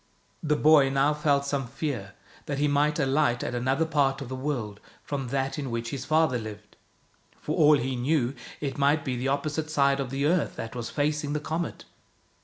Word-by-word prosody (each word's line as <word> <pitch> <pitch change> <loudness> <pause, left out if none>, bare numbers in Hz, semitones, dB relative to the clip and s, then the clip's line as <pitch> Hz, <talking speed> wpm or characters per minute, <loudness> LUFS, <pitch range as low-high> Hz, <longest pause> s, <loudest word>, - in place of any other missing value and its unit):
The 150 -1 +1
boy 150 -2 +5
now 135 +2 +2
felt 145 -2 +1
some 140 -2 -2
fear 125 -7 -4 0.3
that 140 - -2
he 145 +1 +2
might 145 +2 +2
alight 135 -3 +1
at - - -3
another 130 +6 +1
part 140 -4 +1
of 135 -4 -7
the 130 - -4
world 125 -7 -3 0.2
from 135 -3 -4
that 135 +2 -2
in 140 -3 -3
which 115 0 -3
his 130 -2 -5
father 155 -5 +2
lived. 110 -1 -9 0.6
For - - -3
all 150 -1 +6
he 130 +1 -2
knew, 130 0 +1 0.3
it 140 -1 -4
might 145 +2 +2
be 130 -3 -1
the 125 +2 -2
oppo 140 +2 0
site 155 +1 -3
side 140 -2 +2
of 135 -2 -2
the 135 +2 -1
earth 165 0 +1
that 115 +1 -6
was 120 -1 -4
facing 150 0 -1
the 150 - 0
comet. 160 +3 -4
140 Hz, 205 wpm, -27 LUFS, 130-150 Hz, 0.6 s, all